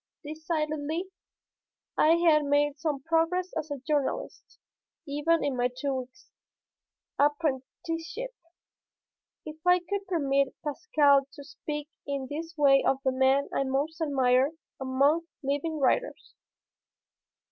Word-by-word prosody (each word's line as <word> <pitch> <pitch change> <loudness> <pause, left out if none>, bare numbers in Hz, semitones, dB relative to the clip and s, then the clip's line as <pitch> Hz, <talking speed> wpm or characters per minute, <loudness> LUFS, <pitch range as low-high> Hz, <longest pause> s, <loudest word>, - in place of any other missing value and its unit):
Decidedly. 310 +2 -3 0.9
I 315 - +5
had 325 -3 +4
made 290 0 +2
some 295 -4 -2
progress 330 +3 +1
as 315 -1 -3
a 285 - -3
journalist, 295 - -3 0.5
even 295 +4 +1
in 280 -2 0
my 245 0 +2
two 280 -2 -1
weeks' 255 +5 -7 0.9
apprenticeship, 330 - -1 1.1
if 310 0 -8
I 360 0 +5
could 390 +3 -4
permit 275 -6 +1
Pascal 290 -4 +3
to 285 -1 -10
speak 295 +1 -6 0.2
in 280 -1 -2
this 325 +3 -5
way 275 -2 +5
of 270 - +2
the 265 - +2
man 265 +2 +3
I - - +1
most 285 +5 -2
admired 265 -1 +2 0.3
among 280 +5 +2 0.2
living 285 +4 -1
writers. 295 - 0
295 Hz, 115 wpm, -28 LUFS, 275-330 Hz, 1.1 s, I